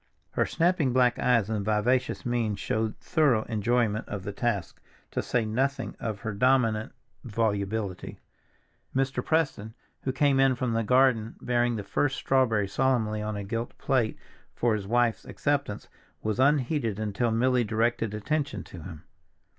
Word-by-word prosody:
Her - - +1
snapping 165 -6 +1
black 125 -1 +3
eyes 115 -5 +3
and 105 -2 -2
vivacious 110 +5 +1
mien 120 -4 0
showed 110 +2 -2
thorough 140 -9 +2
enjoyment 110 0 0
of 100 -2 -5
the 100 - -4
task, 100 -3 -2 0.3
to - - -1
say 120 -3 0
nothing 130 +6 -1
of 110 -3 -4
her 110 -2 -3
dominant 115 -1 +2 0.3
volubility. 105 -3 -2 0.8
Mr. 135 -1 0
Preston, 135 -9 0 0.3
who 130 - -1
came 135 0 +2
in 135 -1 +4
from 125 -2 -1
the 115 - +1
garden 125 -2 +3
bearing 120 -1 +1
the 105 - -4
first 135 +7 0
strawberry 115 -7 +2
solemnly 110 -2 +1
on 105 0 -3
a 100 - -4
gilt 115 +4 -4
plate 125 -5 0 0.4
for 120 -2 +2
his 100 -2 -3
wife's 120 0 +2
acceptance, 140 -7 -2 0.4
was 110 +2 -1
unheeded 135 -5 +2
until 110 +2 -1
Milly 125 +2 +2
directed 115 0 0
attention 145 +6 -2
to 90 - -11
him. 80 -2 -9
115 Hz, 150 wpm, -27 LUFS, 105-130 Hz, 0.8 s, in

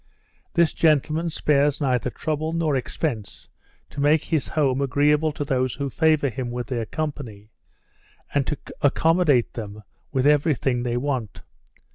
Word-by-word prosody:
This 170 -3 +3
gentleman 155 +1 +2
spares 145 -2 +1
neither 130 -4 0
trouble 155 +4 -3
nor 165 -3 0
expence 125 - -4 0.4
to 145 - -5
make 150 +2 +3
his 155 -5 -1
house 140 -4 +1
agreeable 150 +3 +2
to 145 - -4
those 130 -3 0
who 140 0 -3
favour 155 -2 +2
him 125 +1 -4
with 120 0 -4
their 120 -4 -3
company, 120 -8 -5 0.8
and 140 -2 +1
to 150 - -2 0.2
accommodate 150 -2 +3
them 105 -2 -7 0.3
with 130 -1 0
every 150 +1 +4
thing 125 -1 -1
they 120 0 -1
want. 125 -6 -3
140 Hz, 145 wpm, -23 LUFS, 125-155 Hz, 0.8 s, every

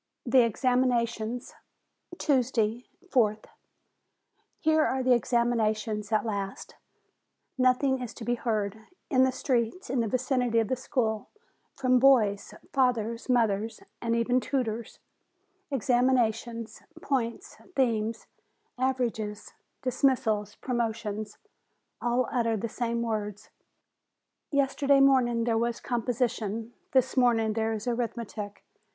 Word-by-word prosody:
THE 255 +1 +5
EXAMINATIONS 240 -1 0 0.6
Tuesday, 245 -4 +1 0.2
4th. 215 -6 +2 1.1
Here 315 0 +3
are 260 -2 0
the 255 0 +5
examinations 225 -3 0
at 215 +1 +2
last! 200 -3 -4 0.8
Nothing 255 +1 +2
else 245 - -4
is - - -10
to 225 - -8
be 240 - +1
heard, 215 -3 -2 0.2
in 260 -2 +5
the 260 - +1
streets 250 +4 -1
in 265 - +1
the 230 - +1
vicinity 250 0 0
of 225 -2 +2
the 260 - +1
school, 225 -4 -2 0.5
from 255 -2 +3
boys, 225 -7 +4 0.2
fathers, 235 -3 0
mothers, 225 -3 +1 0.2
and 230 0 0
even 245 +2 +2
tutors; 235 -4 -3 0.7
examinations, 240 -3 0 0.2
points, 265 - -2 0.2
themes, 225 -4 0 0.5
averages, 235 -5 -2 0.3
dismissals, 235 -5 +1
promotions: 220 -4 -3 0.6
all 245 +1 +1
utter 230 -4 +1
the 230 - -3
same 235 0 -2
words. 210 -3 -4 1.0
Yesterday 280 0 +3
morning 255 -4 +4
there 230 -1 +1
was 235 0 -1
composition; 230 -2 -2 0.2
this 260 -1 +2
morning 230 -4 +3
there 225 0 0
is 220 -1 -4
arithmetic. 230 -3 -4
235 Hz, 110 wpm, -28 LUFS, 220-255 Hz, 1.1 s, THE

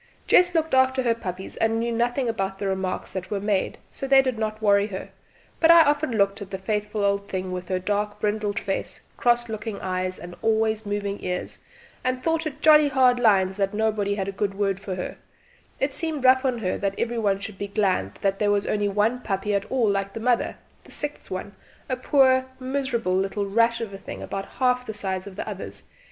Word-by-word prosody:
Jess 355 -1 +4
looked 320 -2 +1
after 260 0 +4
her 235 -2 +3
puppies 190 -4 -6
and 225 0 +1
knew 235 +1 -1
nothing 245 +3 0
about 195 -4 -2
the 200 - -4
remarks 190 -1 -2
that 190 -1 -5
were 205 - -1
made, 200 -1 0
so 270 - -5
they 270 0 +6
did 255 -4 -2
not 215 -1 -2
worry 205 -1 +3
her, 190 -3 -6 0.5
but 325 - +4
I 335 -1 +9
often 290 -2 +1
looked 200 -1 +1
at 200 - -7
the 190 - -4
faithful 210 +1 -2
old 200 0 0
thing 185 -1 -3
with 180 -1 -5
her 185 - 0
dark 205 +2 -2
brindled 210 -1 -1
face, 195 - -3
cross 240 0 +2
looking 220 -1 -5
eyes 185 0 -2
and 175 0 -9
always 220 -1 +1
moving 205 0 -3
ears, 180 0 -3 0.4
and 255 0 -1
thought 325 -1 +1
it 300 0 -8
jolly 305 -1 +7
hard 255 -3 +4
lines 190 -4 +3
that 195 0 0
nobody 210 -2 0
had 195 -2 -2
a - - -2
good 195 0 -2
word 195 -1 0
for 195 -1 -5
her; 180 - -5 0.6
it 270 0 0
seemed 310 -4 -2
rough 260 +1 +6
on 255 -2 +1
her 190 -5 -2
that 195 0 -1
every 235 0 -1
one 200 -3 +2
should 200 -1 -7
be 200 - -3
glad 190 - 0
there 200 +1 +1
was 205 0 +2
only 205 -1 0
one 210 +5 +1
puppy 205 -1 -2
at 200 0 0
all 250 -4 +2
like 195 -1 0
the - - -5
mother 240 +1 +1 0.3
the - - -16
sixth 295 0 -4
one, 185 +2 -5 0.3
a 255 - -1
poor 260 0 +3
miserable 255 -6 -1
little 195 +2 0
rat 230 +3 +2
of 225 -4 -5
a 195 - -7
thing - - -8
about 195 0 -4
half 250 -1 +2
the 220 -3 -6
size 190 -2 -3
of 195 - -9
the - - -5
others. - - -7
210 Hz, 215 wpm, -25 LUFS, 195-250 Hz, 0.6 s, I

